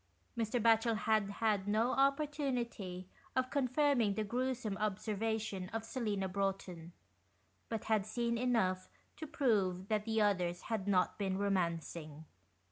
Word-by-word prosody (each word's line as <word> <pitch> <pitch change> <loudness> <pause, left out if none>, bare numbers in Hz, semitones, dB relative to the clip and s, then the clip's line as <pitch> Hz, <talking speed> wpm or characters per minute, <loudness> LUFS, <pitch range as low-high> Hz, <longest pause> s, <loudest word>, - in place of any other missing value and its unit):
Mr. 230 +1 0
Batchel 225 0 +4
had 215 -2 +2
had 205 -1 0
no 220 +4 +2
opportunity 270 -10 0 0.3
of 255 0 +1
con 280 -3 +1
firming 255 -6 +2
the 215 - 0
gruesome 245 -1 -2
observation 210 -1 -2
of 225 0 -4
Selina 210 -6 -2
Broughton, 190 -3 -3 0.8
but 225 -2 -3
had 215 -2 +1
seen 235 +1 0
enough 225 -7 +1 0.3
to 315 - -6
prove 205 - +1
that 210 -1 0
the 225 -1 +1
others 180 -4 +1
had 215 -4 -3
not 185 0 +2
been 190 -2 0
romancing. 170 -5 -2
215 Hz, 130 wpm, -35 LUFS, 190-235 Hz, 0.8 s, Batchel